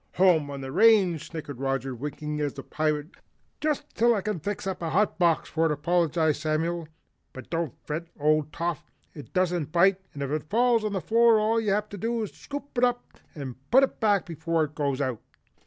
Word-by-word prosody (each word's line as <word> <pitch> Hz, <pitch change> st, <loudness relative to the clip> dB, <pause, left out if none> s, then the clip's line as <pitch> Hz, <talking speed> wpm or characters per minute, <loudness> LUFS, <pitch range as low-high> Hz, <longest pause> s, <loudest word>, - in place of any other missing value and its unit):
"Home 175 Hz, -6 st, +4 dB
on 140 Hz, -1 st, -6 dB
the 135 Hz, 0 st, -6 dB
range!" 195 Hz, -3 st, +4 dB
snickered 145 Hz, -6 st, -7 dB
Roger, 135 Hz, -1 st, -1 dB
winking 150 Hz, +4 st, -5 dB
at 145 Hz, -2 st, -2 dB
the 135 Hz, -, -7 dB
Pirate. 155 Hz, 0 st, -1 dB, 0.5 s
"Just 300 Hz, -1 st, -1 dB
till 235 Hz, +1 st, +3 dB
I 200 Hz, -, -1 dB
can 210 Hz, -3 st, -2 dB
fix 200 Hz, +5 st, -4 dB
up 190 Hz, -2 st, -3 dB
a 165 Hz, -, -2 dB
hot 195 Hz, +5 st, +1 dB
box 170 Hz, -3 st, +2 dB
for 165 Hz, +1 st, +1 dB
it," -, -, 0 dB
apologized 160 Hz, 0 st, +1 dB
Samuel, 160 Hz, +1 st, -1 dB, 0.5 s
"but 130 Hz, -, -11 dB
don't 165 Hz, -5 st, -2 dB
fret, 160 Hz, +3 st, -4 dB
old 155 Hz, 0 st, +2 dB
Toff, 170 Hz, +1 st, -3 dB, 0.2 s
it 145 Hz, -, -11 dB
doesn't 175 Hz, -5 st, 0 dB
bite 190 Hz, +3 st, +4 dB
and 140 Hz, -, -3 dB
if 140 Hz, -, -3 dB
it 155 Hz, 0 st, -3 dB
falls 235 Hz, +1 st, +3 dB
on 210 Hz, -1 st, -2 dB
the 190 Hz, -, -1 dB
floor, 230 Hz, +1 st, +4 dB
all 225 Hz, +2 st, +2 dB
you 215 Hz, -, -1 dB
have 210 Hz, +1 st, 0 dB
to 205 Hz, -, -8 dB
do 230 Hz, +2 st, -1 dB
is 210 Hz, -, -5 dB
scoop 285 Hz, -1 st, -8 dB
it -, -, +1 dB
up 245 Hz, -1 st, 0 dB, 0.2 s
and 135 Hz, -5 st, -6 dB
put 265 Hz, +2 st, +6 dB
it 270 Hz, -, -1 dB
back 205 Hz, -4 st, +2 dB
before 165 Hz, 0 st, -1 dB
it 150 Hz, -1 st, -4 dB
goes 140 Hz, -2 st, -1 dB
out." 130 Hz, -5 st, -2 dB
170 Hz, 210 wpm, -27 LUFS, 150-210 Hz, 0.5 s, put